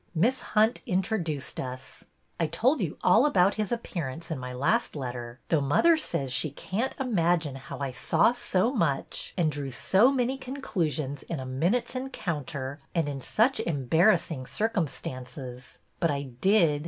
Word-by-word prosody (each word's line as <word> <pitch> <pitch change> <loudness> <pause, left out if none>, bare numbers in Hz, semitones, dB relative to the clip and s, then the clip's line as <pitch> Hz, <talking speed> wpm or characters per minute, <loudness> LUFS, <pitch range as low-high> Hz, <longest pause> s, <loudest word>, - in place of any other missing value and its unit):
Miss 240 +11 +2 0.2
Hunt 220 +3 +4
introduced 180 -6 -1
us. 130 +1 -7 0.3
I 165 - +2
told 235 - +2
you 165 -6 -2
all 180 +7 +6
about 195 -6 +4
his 215 0 -2
appearance 170 - -4
in 155 - -2
my 125 0 -5
last 145 - +1
let 130 -4 -3
ter, 120 0 -7
though 160 -3 +3
mother 235 - +4
says 135 - -2
she 155 - +1
can't 200 - -3
imagine 175 - +1
how 135 0 -8
I 140 -2 -3
saw 160 - +3
so 240 -1 0
much 165 - -1
and 165 -4 +2
drew 145 -2 -4
so 195 - +4
many 265 0 0
conclusions 165 - -2
in 165 - -2
a 130 - -5
minute's 170 - 0
encounter 155 - -4 0.2
and 165 -3 +2
in 140 -2 -4
such 235 - +2
embarrassing 160 - +2
cir 220 +1 0
cumstances. 130 - -5 0.2
But 170 - +2
I 140 -1 -1
did. 150 - +2
165 Hz, 160 wpm, -28 LUFS, 135-220 Hz, 0.3 s, all